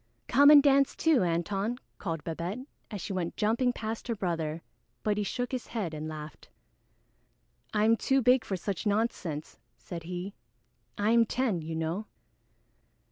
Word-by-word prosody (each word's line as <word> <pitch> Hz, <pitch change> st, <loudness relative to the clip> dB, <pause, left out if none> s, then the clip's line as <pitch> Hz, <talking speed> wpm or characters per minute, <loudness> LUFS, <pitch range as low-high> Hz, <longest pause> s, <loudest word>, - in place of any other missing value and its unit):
"Come 285 Hz, +1 st, +7 dB
and 295 Hz, -2 st, +9 dB
dance 275 Hz, -1 st, +4 dB
too, 320 Hz, -7 st, +3 dB
Antone," 195 Hz, +7 st, -1 dB, 0.2 s
called 165 Hz, -5 st, -3 dB
Babette, 175 Hz, +9 st, -4 dB, 0.2 s
as 205 Hz, -4 st, -5 dB
she 195 Hz, -, -4 dB
went 175 Hz, -2 st, -3 dB
jumping 230 Hz, +4 st, +2 dB
past 225 Hz, 0 st, -5 dB
her 230 Hz, -, -1 dB
brother, 165 Hz, -4 st, -2 dB, 0.4 s
but 210 Hz, -1 st, +1 dB
he 210 Hz, -, -1 dB
shook 245 Hz, +4 st, -3 dB
his 255 Hz, -2 st, -3 dB
head 200 Hz, -9 st, -3 dB
and 155 Hz, 0 st, -4 dB
laughed. 155 Hz, -1 st, -8 dB, 1.2 s
"I 210 Hz, 0 st, +2 dB
am 225 Hz, +1 st, +5 dB
too 270 Hz, +4 st, +2 dB
big 250 Hz, -1 st, +4 dB
for 195 Hz, -4 st, -3 dB
such 200 Hz, +3 st, -3 dB
nonsense," 200 Hz, -8 st, -2 dB, 0.2 s
said 170 Hz, -2 st, -7 dB
he. 180 Hz, +3 st, -5 dB, 0.6 s
"I 205 Hz, +2 st, +2 dB
am 230 Hz, -1 st, +5 dB
ten, 230 Hz, -9 st, 0 dB
you 160 Hz, +1 st, -5 dB
know." 165 Hz, +7 st, -2 dB
205 Hz, 160 wpm, -29 LUFS, 170-235 Hz, 1.2 s, and